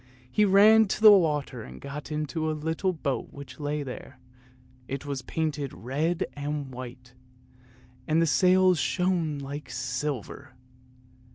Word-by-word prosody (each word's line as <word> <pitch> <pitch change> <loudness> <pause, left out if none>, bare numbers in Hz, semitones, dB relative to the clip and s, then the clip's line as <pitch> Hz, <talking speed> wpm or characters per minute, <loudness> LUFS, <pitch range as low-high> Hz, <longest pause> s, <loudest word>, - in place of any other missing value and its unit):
He 210 - +3
ran 210 +3 +6
to - - -2
the 215 - +11
water 155 -8 +2
and 65 0 -10
got 145 +2 -8
into 155 +1 -2
a 155 - -2
little 160 +5 -1
boat 145 -6 -3
which 140 -2 -11
lay 145 0 -2
there, 130 0 -9 0.7
it 135 +1 -5
was 140 -2 -4
painted 150 0 -3
red 145 - -1
and 145 -2 -4
white, 125 0 -9 0.9
and 155 +1 +2
the 165 - +4
sails 180 +5 +4
shone 175 -5 0
like 140 +1 -7
silver. 130 +1 -4
150 Hz, 140 wpm, -27 LUFS, 135-165 Hz, 0.9 s, the